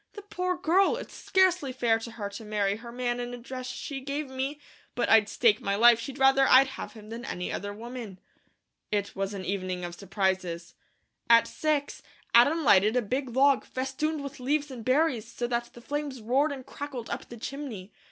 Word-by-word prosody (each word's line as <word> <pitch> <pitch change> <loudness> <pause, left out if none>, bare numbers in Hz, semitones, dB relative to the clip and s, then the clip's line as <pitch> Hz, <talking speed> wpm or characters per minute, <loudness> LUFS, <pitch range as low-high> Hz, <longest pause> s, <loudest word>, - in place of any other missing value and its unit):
The 410 - -9
poor 365 -2 -2
girl! 370 +5 +3
It's - - -8
scarcely 365 -7 +2
fair 235 -3 +1
to 225 0 -8
her 210 -3 -4
to 200 +2 -9
marry 205 -1 0
her 235 +1 -10
man 245 0 -2
in 245 0 -4
a - - -9
dress 255 +1 -7
she 270 +1 -5
gave 280 +1 -4
me; 270 +3 -3 0.4
but 240 - 0
I'd 215 -2 +6
stake 220 -3 +3
my 200 0 0
life 235 +2 +6
she'd 270 +3 -6
rather 270 0 +5
I'd 265 +1 +7
have 265 - -7
him 215 -2 -12
than 230 +1 -7
any 180 -8 -4
other 205 0 -4
woman." 230 -2 -8 0.7
It 205 -1 -1
was 195 +1 -2
an 190 -1 -6
evening 185 -2 -3
of 175 - -6
surprises. 185 -3 -2 0.6
At 230 -1 +7
six, 300 0 -1 0.3
Adam 290 +8 +5
lighted 210 -2 +5
a 250 - +3
big 260 +5 -2
log, 275 0 +4
festooned 280 +4 -3
with 280 -1 -7
leaves 285 +3 0
and 240 -3 -8
berries 255 -3 +1
so 240 - -3
that 240 0 -2
the 240 - -12
flames 285 0 -4
roared 265 +7 +1
and 265 -3 -7
crackled 275 -5 -7
up - - -5
the 235 - -9
chimney. 230 -6 -7
245 Hz, 200 wpm, -28 LUFS, 215-280 Hz, 0.7 s, I'd